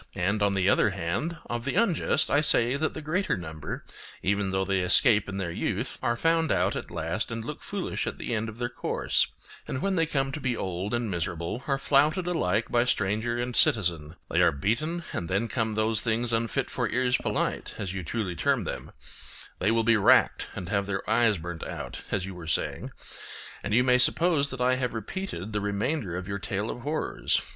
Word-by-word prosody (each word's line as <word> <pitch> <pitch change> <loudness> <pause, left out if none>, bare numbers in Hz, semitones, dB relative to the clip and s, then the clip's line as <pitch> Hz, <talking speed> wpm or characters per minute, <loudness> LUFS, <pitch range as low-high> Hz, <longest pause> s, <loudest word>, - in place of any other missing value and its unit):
And, 100 +4 0
on 100 -1 +2
the 95 -1 +2
other 105 - +4
hand, 95 - -2
of 120 0 -3
the 140 - -2
unjust 180 -8 +2
I 145 - +4
say 125 -4 +3
that 155 +3 -1
the 155 - -6
greater 180 - 0
number, 80 -3 -6 0.4
even 100 0 +1
though 95 0 0
they 95 0 +1
escape 105 +3 +4
in 95 - -4
their 95 -3 -2
youth, - - -2
are 120 0 0
found 165 +3 +2
out - - +2
at - - -5
last 85 +8 -2
and 115 -1 -4
look 150 - -6
foolish 200 -2 -3
at - - -3
the - - -4
end 110 0 -1
of 110 - -10
their 120 0 -1
course, 120 - 0 0.4
and 130 - -3
when 195 +2 0
they 165 -1 +2
come 135 -2 0
to 150 - -4
be 125 -4 -1
old 95 +4 -2
and 120 -3 -2
miserable 85 +6 -3
are 135 -1 +2
flouted 150 +6 +3
alike 110 - 0
by 120 0 +4
stranger 110 0 0
and 120 0 -2
citizen; 85 -7 +2
they - - +2
are - - +5
beaten 125 - -1
and 85 - -3
then 100 +5 +1
come 110 -2 -1
those 110 0 +2
things 115 +1 0
unfit 115 0 0
for - - -1
ears 125 +1 +2
polite, - - -2
as 95 -2 -3
you 95 -1 -4
truly 95 +1 -2
term - - +1
them; - - -5 0.7
they 100 - +2
will 115 0 +2
be 115 0 +4
racked 100 - +4
and 90 - -5
have 100 0 0
their 95 -1 -3
eyes 110 -2 +3
burned 85 0 -6
out, - - -6
as 95 -2 -1
you 95 - -6
were 85 -2 -9
saying. 80 - -1 0.7
And - - -3
you 125 - +5
may 125 0 +4
suppose 155 +1 +3
that 130 -2 -5
I 130 +1 +3
have 125 -2 -2
repeated 110 - -5
the 105 - 0
remainder 100 - -1
of 90 0 -5
your 100 0 -3
tale 105 +1 -2
of 125 - -7
horrors. 150 +4 0
110 Hz, 210 wpm, -27 LUFS, 95-130 Hz, 0.7 s, are